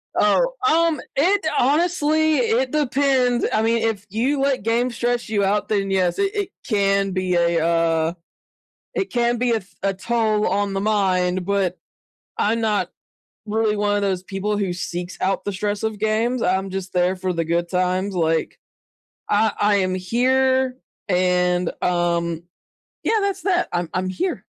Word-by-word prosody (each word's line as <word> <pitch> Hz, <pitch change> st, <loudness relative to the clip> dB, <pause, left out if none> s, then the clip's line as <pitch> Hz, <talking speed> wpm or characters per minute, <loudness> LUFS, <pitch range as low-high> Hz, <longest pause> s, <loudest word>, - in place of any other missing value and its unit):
Oh, -, -, +3 dB, 0.2 s
um, 330 Hz, -2 st, +2 dB
it 375 Hz, +6 st, +2 dB
honestly 315 Hz, +1 st, +2 dB
it 250 Hz, +1 st, +1 dB
depends. 265 Hz, -4 st, +1 dB
I 215 Hz, -, +2 dB
mean, 230 Hz, 0 st, +2 dB
if 215 Hz, -3 st, -1 dB
you 255 Hz, +8 st, 0 dB
let 275 Hz, -3 st, +1 dB
games 235 Hz, +2 st, 0 dB
stress 240 Hz, 0 st, -1 dB
you 205 Hz, -2 st, 0 dB
out, 205 Hz, +2 st, 0 dB
then, 200 Hz, -2 st, 0 dB
yes, 185 Hz, -2 st, +1 dB
it 395 Hz, +1 st, 0 dB
it 405 Hz, -2 st, -1 dB, 0.2 s
can 195 Hz, -3 st, +1 dB
be 185 Hz, -1 st, -1 dB
a, 170 Hz, -1 st, +2 dB
uh 165 Hz, -1 st, +1 dB, 0.8 s
it 390 Hz, -, -2 dB
can 240 Hz, 0 st, +1 dB
be 245 Hz, +1 st, +1 dB
a -, -, +3 dB
f 200 Hz, -2 st, -8 dB
a 195 Hz, 0 st, +1 dB
toll 215 Hz, +1 st, 0 dB
on 205 Hz, 0 st, 0 dB
the 195 Hz, -, -1 dB
mind, 185 Hz, -3 st, +1 dB
but 195 Hz, -2 st, 0 dB, 0.6 s
I'm 225 Hz, +2 st, +1 dB
not 215 Hz, -2 st, 0 dB, 0.6 s
really 215 Hz, 0 st, 0 dB
one 205 Hz, 0 st, +1 dB
of 205 Hz, -, 0 dB
those 190 Hz, -2 st, -1 dB
people 200 Hz, +2 st, -2 dB
who 195 Hz, -3 st, -1 dB
seeks 175 Hz, 0 st, -5 dB
out 195 Hz, +1 st, 0 dB
the 205 Hz, -, -1 dB
stress 205 Hz, +2 st, -2 dB
of 220 Hz, -2 st, -2 dB
games. 225 Hz, +3 st, 0 dB
I'm 190 Hz, 0 st, 0 dB
just 190 Hz, -1 st, -5 dB
there 180 Hz, +1 st, +2 dB
for 185 Hz, 0 st, -2 dB
the 165 Hz, -1 st, -1 dB
good 170 Hz, +1 st, -1 dB
times, 185 Hz, +2 st, 0 dB
like, 165 Hz, -1 st, 0 dB, 0.7 s
I 215 Hz, +1 st, +3 dB
I 205 Hz, 0 st, +3 dB
am 185 Hz, -2 st, 0 dB
here, 260 Hz, +5 st, +1 dB, 0.3 s
and, 180 Hz, -1 st, +1 dB
um 170 Hz, -1 st, 0 dB, 0.6 s
yeah, 450 Hz, -, +2 dB
that's 395 Hz, -1 st, -1 dB
that. 370 Hz, -3 st, +1 dB
I'm 175 Hz, -1 st, -1 dB
I'm 185 Hz, 0 st, -1 dB
here, 275 Hz, -, -3 dB
205 Hz, 165 wpm, -21 LUFS, 185-245 Hz, 0.8 s, Oh